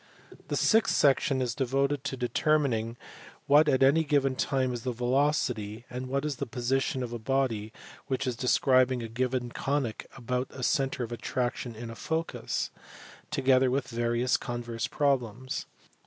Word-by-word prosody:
The - - -2
sixth 225 -1 +3
section 135 -1 +3
is 120 -2 -2
devoted 135 +2 0
to 135 -1 -3
determining 120 -2 +1 0.5
what 150 +2 +5
at 135 -1 +3
any 145 +5 +5
given 140 -3 +1
time 130 -2 0
is 120 - -4
the 125 - -2
velocity 120 -3 0
and 125 +1 -5
what 140 +3 -1
is 145 -4 -2
the - - -3
position 130 +1 -1
of 120 -1 -5
a 120 - -4
body 115 -3 -1 0.4
which 135 0 -1
is 125 -2 -1
describing 130 +1 +3
a - - -4
given 125 +1 -2
conic 135 -5 -2
about 125 +1 -2
a 130 - -8
centre 135 -1 +1
of 120 - -6
attraction 120 0 -3
in 115 +1 -7
a - - -8
focus: 160 +6 -2 0.6
together 130 -3 +3
with 135 +2 -1
various 120 +1 +1
converse 120 0 -4
problems. 130 -3 -1
130 Hz, 155 wpm, -29 LUFS, 120-135 Hz, 0.6 s, what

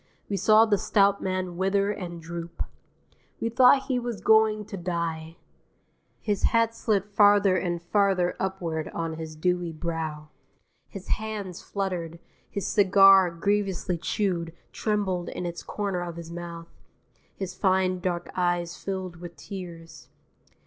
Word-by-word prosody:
We 200 - -2
saw 215 +3 +5
the 205 -3 +2
stout 200 -1 +3
man 185 -2 -2
wither 195 +2 +1
and 175 -4 -6
droop. 170 +1 -6 0.8
We 230 - -1
thought 255 +3 +6
he 255 -2 -1
was 240 -3 -4
going 220 -1 +4
to 210 0 -7
die. 170 -2 -3 0.8
His 205 -3 -1
hat 230 0 +3
slid 210 -4 0
farther 205 -2 +4
and 175 -1 -1
farther 185 0 +1
upward 170 -5 -3
on 165 -1 -2
his 160 -1 -7
dewy 175 +1 0
brow. 155 -2 -4 0.6
His 195 -3 -9
hands 210 -5 -3
fluttered. 180 -4 -3 0.3
His 200 - -4
cigar, 195 -2 +6
grievously 190 0 -1
chewed, 170 -3 -1 0.2
trembled 200 -5 -1
in 180 - -5
its 170 0 -5
corner 200 -3 -3
of 175 -1 -5
his 170 -1 -8
mouth. 170 -1 -8 0.6
His 190 -2 -5
fine 185 -1 +1
dark 175 -1 -3
eyes 175 -1 -1
filled 185 -3 -4
with 170 0 -9
tears. 170 -1 -9
185 Hz, 135 wpm, -26 LUFS, 170-200 Hz, 0.8 s, thought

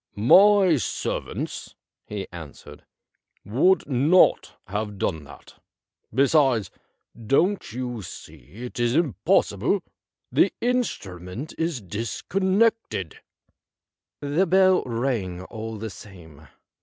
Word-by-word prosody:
' - - -46
My 190 - +6
servants,' 125 - -4 0.3
he 105 -2 -5
answered, 75 -3 -11 0.6
'would 135 - +2
not 145 +7 +3
have 105 0 -4
done 80 -5 -2
that. 70 0 -16 0.5
Be 135 +5 +3
sides, 135 - +2 0.6
don't 175 - +1
you 125 -1 -4
see 80 - -11
it 125 - -8
is 120 +1 +1
impos 160 -7 +2
sible? - - 0 0.5
The 195 - +3
instrument 120 - -3
is 165 -8 -2
discon 120 - -2
nected.' 225 - 0 0.6
' - - -67 0.2
The 190 +1 +4
bell 185 +1 +4
rang 115 -7 -2
all 110 +2 -7
the 110 0 -6
same. 80 -7 -14
120 Hz, 110 wpm, -24 LUFS, -, 0.6 s, My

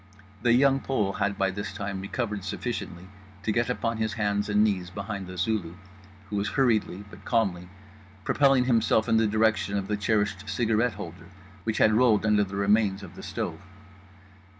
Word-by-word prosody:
The 120 0 +4
Young 135 +2 +4
Pole 105 -8 -1
had 100 0 -1
by 95 -1 +1
this 100 +2 -5
time 100 -1 -4
recovered 105 0 -3
sufficiently 95 -3 -5 0.4
to 110 - 0
get 120 +2 0
upon 115 -2 -1
his 110 -1 -1
hands 105 -1 -1
and 105 +1 +4
knees 95 -5 0
behind 100 +1 -5
the 90 0 -8
Zulu; 95 -5 -1 0.6
who 105 - -1
was 100 +1 0
hurriedly 110 -7 +1
but 95 +2 -13
calmly 95 -7 0 0.5
propelling 135 -1 +3
himself 115 -3 +2
in 115 -1 +3
the 110 -1 +3
direction 110 -1 +1
of 95 -1 -3
the 105 - 0
cherished 105 -1 0
cigarette 115 +2 +1
holder, 90 -3 -9 0.4
which 110 - -1
had 110 - +4
rolled 110 -2 +4
under 105 -1 +4
the 100 0 -6
remains 100 0 +2
of 90 - -10
the - - -9
stove. - - -4
105 Hz, 175 wpm, -27 LUFS, 100-115 Hz, 0.6 s, The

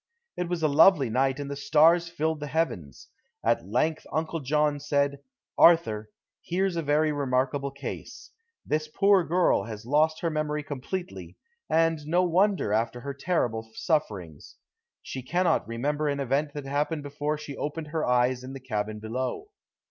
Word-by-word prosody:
It 180 -1 -3
was 175 -2 -2
a - - +5
lovely 150 - +5
night 135 +3 +1
and 145 - -4
the 140 - -4
stars 165 +4 +4
filled 160 -2 -1
the 150 - -5
heavens. 120 - -3 0.4
At 90 - +1
length 155 +9 0
Uncle 160 +1 -2
John 150 +1 +1
said, 140 -1 0 0.4
"Arthur, 110 -11 +5 0.3
here's 185 +1 -1
a 165 - 0
very 150 +1 +2
remarkable 140 0 0
case. 140 +1 -8 0.3
This 155 0 -1
poor 195 +3 +3
girl 175 +2 +2
has 110 -1 -8
lost 155 +4 +2
her 165 - 0
memory 150 -1 -2
completely, 160 +6 -6 0.3
and 165 0 +2
no 175 +3 +3
wonder, 180 - +2
after 115 +2 -1
her 140 +2 -5
terrible 120 -8 -1
sufferings. 100 - -2 0.5
She 130 - -6
cannot 170 - +1
remember 145 +6 -1
an 140 -1 -1
event 140 +2 -1
that 145 -2 -5
happened 145 +2 -1
before 145 +1 -3
she 150 -2 -8
opened 150 +1 -4
her 155 0 -2
eyes 125 +1 +2
in 130 +1 -8
the 135 - -7
cabin 110 -4 -3
below. 130 - -4
145 Hz, 160 wpm, -27 LUFS, 130-160 Hz, 0.5 s, a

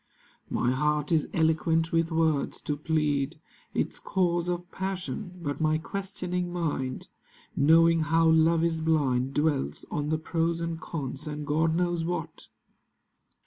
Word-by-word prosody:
My 125 - +1
heart 150 +3 0
is 160 -3 +2
eloquent 160 0 +2
with 165 0 +1
words 160 -3 +1
to 150 - -1
plead 150 -1 0 0.4
Its - - -1
cause 175 -2 0
of 175 0 -3
passion; 190 0 -4
but 145 0 -3
my 155 0 +3
questioning 180 0 -3
mind, 145 -7 -2 0.5
Knowing 165 +3 +5
how 165 +1 +3
love 160 +1 +4
is 165 -1 0
blind, 140 -5 +1
Dwells 145 -2 0
on 150 0 -2
the 155 - +1
pros 165 +1 -1
and 165 -1 -3
cons, 145 -2 -4
and 150 0 -4
God 160 +2 +1
knows 175 -1 0
what. 175 +2 -4
160 Hz, 140 wpm, -28 LUFS, 150-170 Hz, 0.5 s, Knowing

